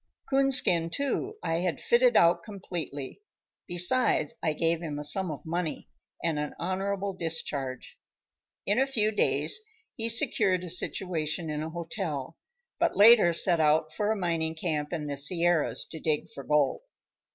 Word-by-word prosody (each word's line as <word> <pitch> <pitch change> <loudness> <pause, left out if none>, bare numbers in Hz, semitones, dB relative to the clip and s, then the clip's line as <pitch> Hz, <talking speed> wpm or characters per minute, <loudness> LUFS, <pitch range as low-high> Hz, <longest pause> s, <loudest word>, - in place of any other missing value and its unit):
Coonskin, 265 -12 +4
too, 280 - -2
I 165 0 -1
had 175 -1 -2
fitted - - +3
out 170 +1 +4
completely; 175 - -7 0.5
besides 180 +8 +2
I 155 - 0
gave 165 +2 -1
him 155 -4 -5
a 150 - -5
sum 185 +5 +1
of 150 - -7
money 165 0 -4 0.3
and 160 -3 -1
an 150 0 -5
honorable 195 +2 -3
discharge. 150 -7 -4 0.7
In 205 +5 +1
a 270 - +2
few 215 -5 0
days 220 - +2 0.4
he 230 0 -3
secured 195 -5 +1
a 175 - -3
situation 165 -3 0
in 150 0 -3
a 160 - -4
hotel, 165 -3 -5 0.4
but - - 0
later 210 -4 +7
set 170 0 +6
out 155 0 +2
for 210 0 -1
a - - 0
mining 165 -4 -2
camp 155 -3 -3
in 160 -4 -4
the 145 -1 -4
Sierras 170 +3 0
to 160 - -7
dig 155 -2 -2
for 140 - -9
gold. 150 - +1
170 Hz, 155 wpm, -27 LUFS, 155-200 Hz, 0.7 s, later